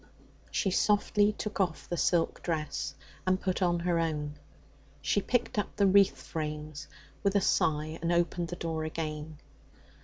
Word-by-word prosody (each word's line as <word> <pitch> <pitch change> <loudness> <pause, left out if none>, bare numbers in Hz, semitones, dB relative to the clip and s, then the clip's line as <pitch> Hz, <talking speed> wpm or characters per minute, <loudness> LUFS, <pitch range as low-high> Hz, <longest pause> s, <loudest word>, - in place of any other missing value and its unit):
She 195 - 0
softly 205 +1 +3
took 210 0 -5
off 175 -4 -1
the 175 - -2
silk 170 0 +1
dress, 160 -3 -2 0.3
and 185 0 +3
put 190 0 -1
on 175 -1 +2
her 170 -1 +1
own. 150 -3 -1 0.7
She 145 +8 +1
picked 240 -1 0
up 205 - -3
the 200 - +3
wreath 195 0 +4
frames 150 -2 -5 0.3
with 200 0 +1
a - - +6
sigh 155 -3 +1
and 170 +1 0
opened 175 0 +1
the 175 - -5
door 165 -2 -3
again. 155 -1 -4
170 Hz, 155 wpm, -30 LUFS, 155-190 Hz, 0.7 s, a